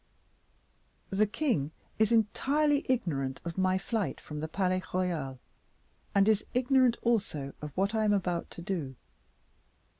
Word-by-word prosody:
The 205 +2 +3
king 205 - 0 0.3
is 220 +1 +4
entirely 280 +7 +2
ignorant 140 - 0
of 170 -1 -4
my 185 0 +2
flight 210 +2 -2
from 150 -1 -7
the 155 - -3
Palais 185 +2 0
Royal, 165 -8 -1 0.8
and 200 0 +5
is 215 -1 +3
ignorant 255 -1 +4
also 200 -12 0
of 150 0 -5
what 200 +3 +1
I 220 -1 +2
am 210 - +3
about 180 -4 -1
to 170 - -9
do." 165 -9 -3
195 Hz, 140 wpm, -30 LUFS, 165-225 Hz, 0.8 s, and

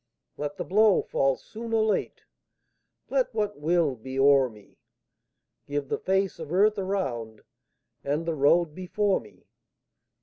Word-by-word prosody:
Let 145 0 -5
the - - -3
blow 210 +1 +4
fall 135 -1 +1
soon 225 - -8
or 220 -1 +3
late, 215 -1 -1 0.9
Let - - 0
what 210 -4 -2
will 160 -2 +1
be 130 +3 -8
o'er 135 -1 +5
me; 105 -3 -18 0.9
Give 145 -1 -3
the - - -1
face 190 -1 0
of 160 -2 -7
earth 205 +3 +3
around 125 - -3 0.6
And 145 +4 -1
the 165 - -1
road 155 +2 +3
before 190 +3 0
me. 105 -5 -18
165 Hz, 140 wpm, -26 LUFS, 135-200 Hz, 0.9 s, o'er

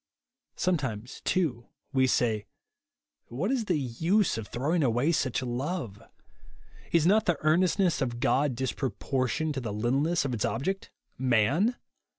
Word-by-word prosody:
Sometimes, 130 - -2
too» 135 -11 0 0.3
we 130 -1 +4
say, 110 -5 +1 0.8
What 155 - -2
is 250 -5 0
the 180 -5 +1
use 165 - +1
of 110 -2 -5
throwing 155 +8 0
away 125 +5 +2
such 130 -6 0
love? 125 - -3 0.9
Is 165 -2 +3
not 210 +4 +4
the 175 -4 +2
earnestness 175 +2 +2
of 120 -3 -2
God 135 +1 +2
disproportioned 130 +3 -1
to 135 - -3
the 115 -3 -4
littleness 135 +10 +1
of 130 - -2
its 110 - -1
ob 120 - -1
ject, 195 +3 -2 0.2
— - - -44
man? 130 - +2
135 Hz, 145 wpm, -28 LUFS, 120-170 Hz, 0.9 s, we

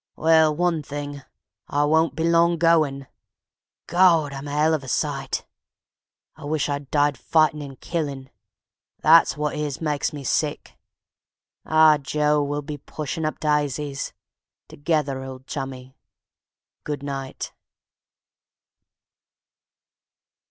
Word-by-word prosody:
Well, 160 -1 +4
one 175 -1 +1
thing, 145 0 -6 0.5
I 145 +1 +1
won't 160 +2 +2
be 160 - -2
long 170 +1 +3
goin'. 155 -5 +2 0.8
Gawd! 170 -5 +4
I'm 135 +1 -7
a - - -5
'ell 150 +2 +2
of 155 -3 -1
a - - -10
sight. 135 0 -2 0.9
Wish 150 -1 -2
I'd 140 -1 -4
died 145 -3 +1
fightin' 155 -2 +2
and 135 -2 -9
killin'; 140 -6 -4 0.7
that's 165 0 +5
wot 150 0 -1
it - - -4
is 150 -3 -3
makes 150 -2 -1
me 145 -2 -7
sick.... 145 +3 -2 0.9
Ah, 155 -1 +6
Joe! 150 +1 +1
we'll 145 +1 -2
be 145 0 -6
pushin' 155 +3 -5
up 155 - -3
dysies... 150 -2 -1 0.6
together, 150 -3 -1
old 130 0 -9
Chummie... 130 -2 -6 0.9
good 145 -2 -4
night! 135 -2 -5
150 Hz, 115 wpm, -23 LUFS, 140-155 Hz, 0.9 s, Ah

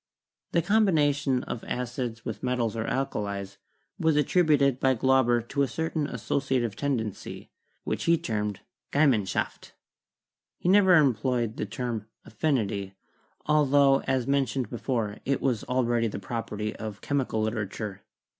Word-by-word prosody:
The 170 - +3
combination 150 - +2
of 115 - -5
acids 125 -2 -4
with 105 -3 -5
metals 125 -3 -1
or 110 -1 -2
alkalis 100 -7 -3 0.4
was 160 -2 +3
attributed 145 -3 +3
by 130 0 +3
Glauber 125 -1 +3
to 140 +1 0
a 140 - +3
certain 160 +3 -2
associative 130 -8 -1
tendency, 120 -8 -3 0.3
which - - -2
he 170 0 +4
termed 105 - -3 0.3
'Gemeinschaft.' 130 -10 +1 0.8
He 175 - -1
never 190 -1 +6
employed 125 -5 +2
the - - -2
term 120 -5 -4 0.2
'affinity,' 105 -7 -1 0.5
altho, 140 -2 +4
as 130 -2 +1
mentioned 135 -2 0
before, 115 -4 -2
it 140 -1 0
was 125 -5 0
already 120 -2 +1
the 105 - -5
property 105 0 -4
of 110 -2 -6
chemical 130 -6 -1
literature. 105 -2 -3
125 Hz, 125 wpm, -27 LUFS, 110-140 Hz, 0.8 s, never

